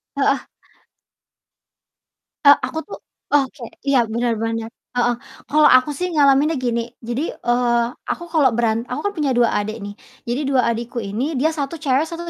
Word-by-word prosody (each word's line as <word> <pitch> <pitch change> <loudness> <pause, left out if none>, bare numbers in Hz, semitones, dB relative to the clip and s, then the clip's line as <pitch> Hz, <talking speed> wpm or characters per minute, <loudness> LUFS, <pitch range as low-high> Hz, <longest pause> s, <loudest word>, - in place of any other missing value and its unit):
Heeh. 275 -1 +1 2.0
Eee, 285 0 +9
aku 320 - -4
tuh 410 - -8 0.4
oke 275 -2 +1 0.2
iya, 260 -4 +4
bener 235 +1 0
bener, 225 0 -2 0.3
heeh, 245 0 +2 0.3
kalau 305 +1 +5
aku 255 +3 -1
sih 360 +6 -2
ngalaminnya 290 +1 +4
gini. 235 -1 -2
Jadi, 240 +6 -3
eee, 240 -1 +1 0.3
aku - - -5
kalau 305 -5 +4
beran 230 0 0
aku 250 - -3
kan 405 - -11
punya 295 -3 +1
2 240 -1 +3
adik 215 +2 -3
nih, 205 0 -6 0.4
jadi 250 +5 -1
2 270 -2 +3
adikku 235 +1 -3
ini 225 +10 -3
dia 310 +4 +3
1 285 +2 -3
cewek, 280 +1 +2
1 340 +1 -6
255 Hz, 160 wpm, -20 LUFS, 235-290 Hz, 2.0 s, Eee